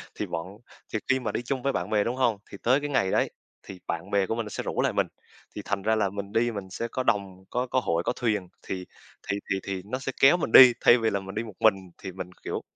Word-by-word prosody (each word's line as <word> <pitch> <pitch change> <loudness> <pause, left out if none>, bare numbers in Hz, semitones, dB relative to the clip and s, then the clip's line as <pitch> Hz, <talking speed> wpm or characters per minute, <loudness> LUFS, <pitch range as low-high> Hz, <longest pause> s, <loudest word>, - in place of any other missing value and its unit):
Thì - - -3
bọn 80 +1 -4 0.5
thì 110 - 0
khi 135 0 +3
mà 115 -4 -3
đi - - -2
chung 130 +1 -2
với 140 0 +1
bạn 90 +2 -2
bè, 105 -1 +2
đúng 120 +3 -2
hông? 120 -5 +2
Thì 100 - -8
tới 130 +4 +4
cái 145 - -3
ngày 110 -9 +1
đấy, - - +2 0.3
thì 95 -2 -10
bạn 85 +4 -4
bè 100 -1 +3
của 110 - -1
mình 115 -1 -2
nó - - -7
sẽ - - -4
rủ - - -1
lại - - +1
mình, - - +1 0.5
thì 105 - -4
thành 100 -1 -1
ra 110 +2 +2
là 105 -3 +1
mình 100 +1 -6
đi 120 +1 +2
mình 100 -3 -6
sẽ 115 +5 -4
có 130 +2 -3
đồng 100 -5 -1
có 125 +1 -1
có 130 - +1
hội 85 +1 0
có - - +1
thuyền, 105 -6 -1 0.2
thì 90 -1 -5 0.4
thì 100 - +1
thì 95 - +1
thì 95 -1 -4
nó 125 +5 -3
sẽ 135 - -3
kéo 140 +6 +7
mình 160 - -2
đi, 125 0 +10
thay 120 - +7
vì 115 -2 +1
là 100 - -1
mình 95 0 -9
đi 110 - -1
một 110 -4 -10
mình, 110 -3 +5 0.2
thì 95 - -7
mình 95 0 -7
kiểu - - -3
105 Hz, 285 wpm, -27 LUFS, 95-120 Hz, 0.5 s, đi